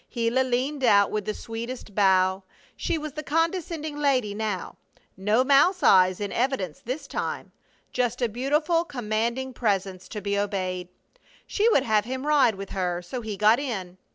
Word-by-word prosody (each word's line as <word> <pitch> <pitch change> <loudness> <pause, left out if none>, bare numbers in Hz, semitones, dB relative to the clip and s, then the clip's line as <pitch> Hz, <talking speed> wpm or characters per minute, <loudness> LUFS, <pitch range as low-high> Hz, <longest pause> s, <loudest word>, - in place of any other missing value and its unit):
Gila 235 +1 +1
leaned 260 +3 -1
out 200 -4 +5
with 210 -2 -2
the 215 - -2
sweetest 230 -1 -7
bow. 190 -1 +3 0.3
She - - -1
was 305 -2 -6
the 305 - -5
condescending 325 -1 -1
lady 260 -8 +1
now; 210 -3 -4 0.4
no 210 +6 +2
mouse 290 +7 +4
eyes 185 -1 +5
in 205 -1 -3
evidence 240 - -1
this 270 +5 -4
time; - - -4 0.4
just 245 -1 0
a 245 - +2
beautiful, 300 +9 +1
commanding 235 -1 -2
presence 195 -5 -1
to 210 - -6
be 200 0 -1
obeyed. 185 -3 -2 0.6
She 435 +3 +2
would 280 - +3
have 215 -4 +2
him 260 +3 -4
ride 285 -7 +4
with 195 0 -8
her, 180 -2 -2
so 245 +8 -5
he 215 -3 -5
got 215 +4 +5
in. 190 -10 -5
230 Hz, 165 wpm, -25 LUFS, 200-275 Hz, 0.6 s, out